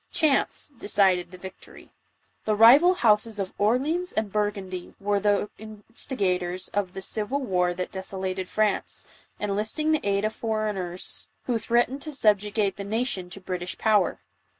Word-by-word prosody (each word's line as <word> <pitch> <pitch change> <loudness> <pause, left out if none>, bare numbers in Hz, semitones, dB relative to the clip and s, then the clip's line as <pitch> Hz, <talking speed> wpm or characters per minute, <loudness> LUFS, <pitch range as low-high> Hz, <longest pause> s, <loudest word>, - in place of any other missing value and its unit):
Chance 300 -1 +1
decided 185 -4 +2
the 185 - -11
victory. 190 +1 -12 0.5
The 215 - +2
riyul 280 - +8
hous:s 215 - +2
ol 190 -1 -2
Orleans 285 - +1
and 215 -2 -2
Burgundy 200 -3 -3
were 205 0 +1
the 205 +1 +1
instigators 200 -4 -3
of 200 -3 -2
the 190 - -5
civil 220 +8 -1
war 180 -8 0
that 180 0 -4
desolated 190 -1 -4
France, 215 -2 0 0.3
en 205 -1 -1
listing 220 +10 0
the 310 - +2
aid 200 +1 +1
of 215 - -1
foreigners 210 -6 -2
who 240 -3 -1
threatened 240 +5 +1
to 305 - -4
subjugate 210 -4 +1
the 200 - -5
nation— 205 -3 -2
to 185 - -6
«Britisli 180 -1 -5
power. 215 -2 +2
205 Hz, 150 wpm, -26 LUFS, 190-225 Hz, 0.5 s, riyul